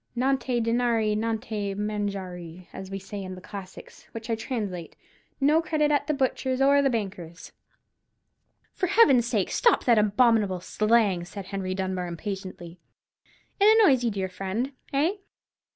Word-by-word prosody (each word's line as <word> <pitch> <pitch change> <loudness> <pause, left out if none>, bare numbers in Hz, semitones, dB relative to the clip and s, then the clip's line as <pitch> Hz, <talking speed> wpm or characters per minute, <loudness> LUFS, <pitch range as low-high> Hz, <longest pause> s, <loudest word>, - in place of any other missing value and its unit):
'Nante 260 -1 0
dinari, 230 -2 +1
nante 215 -2 -2
manjare,' 190 -4 -4
as 190 0 -8
we 195 - -4
say 195 +1 -7
in 185 -1 -6
the - - -10
Classics, 190 0 -11
which 230 +1 -6
I - - +2
translate, 210 -7 -5 0.4
'No 300 +4 +4
credit 305 -2 +1
at 290 - +1
the 305 - +1
butcher's 260 -1 -1
or 280 +1 +5
the 275 - +2
baker's.'" 190 -7 -5 1.2
"For 370 - -1
Heaven's 290 - +5
sake, 215 -6 0
stop 475 - +3
that 235 -3 +4
abominable 210 -3 +3
slang!" 210 -1 +1
said 195 +2 -8
Henry 190 -1 -4
Dunbar, 185 -1 -2
impatiently. 185 -1 -7 0.8
"It 430 +3 +6
annoys 270 - +5
you, 235 - +2
dear 195 -3 -2
friend, 195 +8 -3 0.2
eh? 310 +9 +1
215 Hz, 145 wpm, -26 LUFS, 190-255 Hz, 1.2 s, It